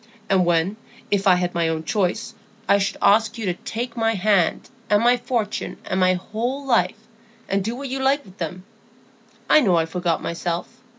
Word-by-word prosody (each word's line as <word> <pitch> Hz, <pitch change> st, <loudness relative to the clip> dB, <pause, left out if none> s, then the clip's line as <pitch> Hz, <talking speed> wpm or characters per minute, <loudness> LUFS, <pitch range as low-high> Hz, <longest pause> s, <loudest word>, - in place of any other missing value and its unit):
And 185 Hz, -2 st, +3 dB
when, 175 Hz, +4 st, +1 dB, 0.3 s
if 200 Hz, 0 st, +1 dB
I 185 Hz, -, +7 dB
had 180 Hz, 0 st, -1 dB
my 170 Hz, -2 st, +1 dB
own 160 Hz, -1 st, -2 dB
choice, 185 Hz, +1 st, -1 dB, 0.3 s
I 200 Hz, -, +4 dB
should 195 Hz, -, -1 dB
ask 220 Hz, +3 st, +4 dB
you 225 Hz, -, -4 dB
to 180 Hz, -, +1 dB
take 230 Hz, +6 st, -5 dB
my 225 Hz, -1 st, +1 dB
hand 195 Hz, -3 st, +1 dB, 0.2 s
and 210 Hz, +1 st, +3 dB
my 245 Hz, +1 st, +5 dB
fortune 240 Hz, -3 st, -3 dB
and 190 Hz, -, -1 dB
my 185 Hz, 0 st, +4 dB
whole 240 Hz, +9 st, -4 dB
life, 225 Hz, -6 st, +2 dB, 0.5 s
and 195 Hz, 0 st, 0 dB
do 225 Hz, +4 st, -3 dB
what 275 Hz, +1 st, -6 dB
you 265 Hz, +1 st, -3 dB
liked 275 Hz, +2 st, +1 dB
with 190 Hz, -1 st, -17 dB
them! 180 Hz, +2 st, -5 dB, 0.8 s
I -, -, +6 dB
know 200 Hz, -, +3 dB
I 165 Hz, -1 st, +2 dB
forgot 170 Hz, 0 st, -1 dB
myself. 170 Hz, 0 st, -3 dB
200 Hz, 190 wpm, -22 LUFS, 180-230 Hz, 0.8 s, I